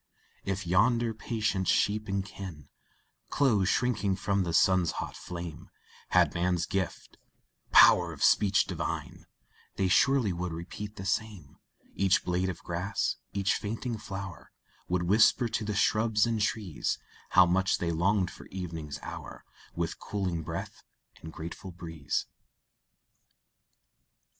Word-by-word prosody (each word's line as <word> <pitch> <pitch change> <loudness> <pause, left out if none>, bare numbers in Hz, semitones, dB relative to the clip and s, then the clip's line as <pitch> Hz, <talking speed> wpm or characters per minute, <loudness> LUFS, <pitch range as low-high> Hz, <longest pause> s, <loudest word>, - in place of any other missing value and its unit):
If 95 -1 -2
yonder 115 +6 +3
patient 110 -4 -1
sheep 105 +1 +2
and 100 -1 -1
kine, 90 -8 -9 0.6
Close 105 -9 +2
shrinking 105 -6 +1
from 100 +1 0
the 85 -2 -1
sun's 90 0 +3
hot - - -5
flame, 85 -3 -7 0.4
Had - - +4
man's 85 -1 0
gift 95 -3 -4 0.5
"power - - +7
of - - -5
speech 100 0 +4
divine," - - -5 0.5
They 95 - +1
surely 120 +1 +3
would 90 0 -4
repeat 95 +5 -7
the 95 - -7
same 100 -7 -3 0.3
Each 95 -2 +2
blade 90 +1 0
of 85 - -6
grass, 90 +4 -2
each 100 -1 +1
fainting 115 +2 -3
flower, 95 -3 -7 0.4
Would 90 0 0
whisper 110 +6 +4
to 110 - -2
the 105 -1 -3
shrubs 110 +1 +3
and 115 -2 -1
trees, 105 -6 -1 0.4
How 95 - +9
much 95 +3 +2
they 85 -1 -1
longed 90 +2 +1
for - - -12
evening's 80 -6 -6
hour, - - -8 0.3
With 85 -1 -3
cooling 95 -5 -2
breath - - -6 0.4
and 80 - -8
grateful 85 +4 -7
breeze. 80 -5 -4
95 Hz, 130 wpm, -29 LUFS, 85-105 Hz, 0.6 s, How